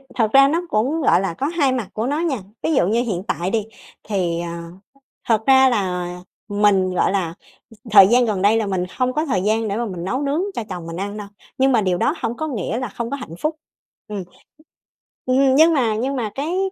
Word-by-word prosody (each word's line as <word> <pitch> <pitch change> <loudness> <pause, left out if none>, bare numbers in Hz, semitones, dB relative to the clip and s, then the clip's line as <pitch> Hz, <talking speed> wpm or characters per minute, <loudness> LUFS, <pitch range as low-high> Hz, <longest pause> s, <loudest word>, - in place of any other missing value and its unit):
thật 220 -3 +1
ra 275 0 +7
nó 330 +4 0
cũng, 265 +10 0
gọi 185 - +4
là, 195 -4 -2
có 275 +11 -2
hai 300 -5 +1
mặt 240 -7 -2
của 220 +3 -2
nó 295 +3 -1
nha. 320 -7 0 0.3
Ví 320 - +1
dụ 180 - +3
như 230 +3 +2
hiện 195 -7 -3
tại 175 -2 -1
đi 220 -1 -1 0.4
thì, 180 -5 -1
ờ, 170 - -5 0.8
thật 220 -2 +2
ra 265 0 +6
là 185 -6 -1 0.4
mình, 205 -2 +2
gọi - - +2
là, 180 -5 -1 0.4
ừ, 225 - -16 0.2
thời 195 -2 +9
gian 245 +2 +4
gần 210 -4 -1
đây 210 +3 +4
là 220 - 0
mình 185 -2 -1
hông 255 0 0
có 305 +3 0
thời 225 - 0
gian 220 +1 +1
để 200 - -2
mà 235 - -1
mình 180 -5 -6
nấu 255 +10 -2
nướng 285 +4 0
cho 235 - -3
chồng 175 -3 -6
mình 165 +1 -6
ăn 205 +2 -4
đâu, 205 - -7 0.3
nhưng 265 +1 +3
mà 230 -3 +3
điều 185 -2 0
đó 290 - +1
hổng 235 0 -2
có 315 - -3
nghĩa 230 - -3
là 255 - -3
không 235 +3 -5
có - - -2
hạnh 250 -11 -9
phúc, 305 +1 -1 0.5
ừm. 205 -3 -5 1.0
Ừm, 260 +1 +3
nhưng 320 +2 +6
mà 235 -7 +1
nhưng 260 +5 -2
mà 225 -5 -3
cái 315 +7 -2
225 Hz, 235 wpm, -20 LUFS, 195-265 Hz, 1.0 s, thời